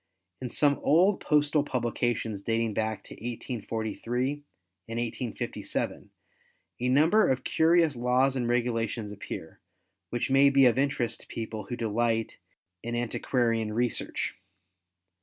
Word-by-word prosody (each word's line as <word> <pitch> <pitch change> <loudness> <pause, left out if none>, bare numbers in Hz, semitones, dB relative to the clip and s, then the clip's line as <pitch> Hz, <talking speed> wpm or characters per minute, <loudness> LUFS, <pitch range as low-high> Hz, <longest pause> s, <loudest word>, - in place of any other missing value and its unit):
—In 125 - -3
some 145 +3 +3
old 185 +6 +4
postal 150 0 +2
publications 120 -5 -1
dating 115 +1 0
back 110 0 -2
to - - -11
1843 120 +1 -3 0.6
and 115 +1 -3
1857, 120 0 -3 0.7
a 125 +1 0
number 160 +11 +5
of 130 -1 0
curious 165 -2 +3
laws 125 +2 +2
and 125 -2 -1
regulations 115 -3 -1
appear 105 - -8 0.5
which 120 +2 -2
may 135 +1 +6
be 135 -1 +5
of 125 +1 +4
interest 130 -4 0
to - - -18
people 110 -2 -5
who 120 - -4
delight 115 0 -1 0.4
in 120 0 -4
antiquarian 115 -2 0
research. 120 +2 -1
120 Hz, 120 wpm, -28 LUFS, 115-135 Hz, 0.7 s, may